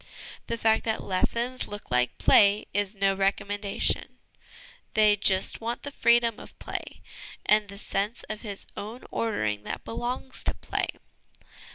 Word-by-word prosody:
The 230 - -2
fact 220 -1 +3
that 220 -1 -1
lessons 235 +7 -1
look 205 -7 -9
like 125 0 +1
play 205 0 +5
is 205 0 0
no 195 0 +2
recommendation: 200 +1 0 0.8
they 215 -1 +6
just 195 -1 +2
want 235 +1 -3
the 285 - -5
freedom 235 -3 +3
of - - -13
play - - -6 0.4
and 210 0 +4
the 200 - -8
sense 200 +3 -1
of 215 -1 -6
his 205 -3 -5
own 220 +5 -7
ordering 110 - -1
that - - -6
belongs 250 +3 -4
to - - 0
play. - - -2
210 Hz, 145 wpm, -27 LUFS, 195-230 Hz, 0.8 s, they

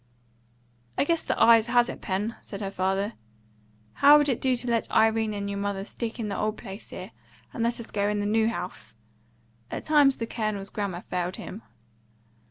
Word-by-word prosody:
"I - - +3
guess 335 +2 +1
the - - -2
ayes 230 -1 +6
has 240 0 +4
it, - - -7
Pen," 205 +4 -2
said 200 - -8
her 195 -1 -3
father. 195 +3 -1 0.8
"How 290 - +7
would 290 -1 +2
it 250 - 0
do 260 -1 +2
to 245 +1 -5
let 230 -1 0
Irene 220 -1 +2
and 200 0 -3
your 200 0 -3
mother 200 -1 -2
stick 230 +2 -5
in 220 - -2
the 200 - -3
old 215 0 -1
place 195 +2 -9
here, - - -8 0.4
and 230 0 0
us 235 - -1
go 205 0 0
into 210 0 0
the - - -1
new 220 +1 +2
house?" 180 - -6 0.7
At - - -5
times 290 -3 +5
the 230 - -2
Colonel's 215 -4 -3
grammar 195 -4 -3
failed 180 0 -3
him. 210 - -8
215 Hz, 190 wpm, -27 LUFS, 200-235 Hz, 0.8 s, How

